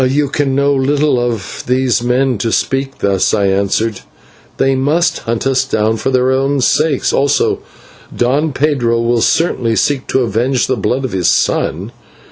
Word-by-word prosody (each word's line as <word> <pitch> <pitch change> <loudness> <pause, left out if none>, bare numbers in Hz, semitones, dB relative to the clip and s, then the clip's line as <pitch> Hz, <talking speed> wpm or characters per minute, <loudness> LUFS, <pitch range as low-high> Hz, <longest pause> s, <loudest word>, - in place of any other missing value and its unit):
"You 145 +1 0
can 140 -2 -1
know 140 +1 +2
little 140 0 +1
of 115 -5 -4
these 125 -2 +1
men 125 -1 0
to 115 +3 -1
speak 135 +3 -1
thus," 100 0 +1
I 100 -2 +1
answered; 100 +2 0 0.6
"they 135 - +2
must 145 +6 +1
hunt 115 +2 -3
us 135 -1 +2
down 110 -4 0
for 135 - -2
their 130 0 +2
own 135 +1 0
sakes, 150 +2 +1
also 140 +1 +1 0.5
Don 140 +6 0
Pedro 130 -5 0
will 115 0 +1
certainly 120 -9 +1
seek 135 +3 0
to 130 - +1
avenge 120 +3 0
the 130 - -1
blood 125 +5 -1
of 130 - -4
his 90 -3 0
son. - - 0
130 Hz, 165 wpm, -14 LUFS, 115-135 Hz, 0.6 s, know